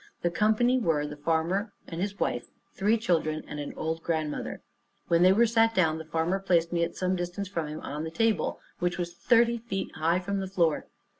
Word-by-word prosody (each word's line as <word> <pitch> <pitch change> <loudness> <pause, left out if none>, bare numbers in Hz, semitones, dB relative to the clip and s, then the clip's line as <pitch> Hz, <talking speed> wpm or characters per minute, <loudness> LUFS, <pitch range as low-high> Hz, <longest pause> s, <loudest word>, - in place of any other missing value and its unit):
The 175 - +2
company 220 +6 +3
were, 160 -9 +1
the 150 0 -6
farmer 165 +7 0
and 165 0 -5
his 200 0 -3
wife, 120 - -1 0.3
three 210 +4 +2
children, 160 -8 0
and 150 - -6
an 145 - -4
old 160 +1 -2
grandmother. 155 -3 -3 0.5
When 170 0 +4
they 185 +1 +7
were 225 +5 +5
sat 225 0 +3
down, 160 -3 +2
the 160 - -7
farmer 165 +4 0
placed 175 -3 +1
me 170 -1 +2
at 170 - -3
some 185 0 0
distance 175 +3 -3
from 165 -5 -3
him 155 +1 -6
on 150 +2 -4
the 160 - -3
table, 210 0 0 0.2
which 175 0 0
was 175 -1 -3
thirty 235 +5 +3
feet 220 -4 -4
high 165 +2 +2
from 200 +2 -2
the 190 - -3
floor. 170 -5 +1
175 Hz, 210 wpm, -28 LUFS, 160-200 Hz, 0.5 s, they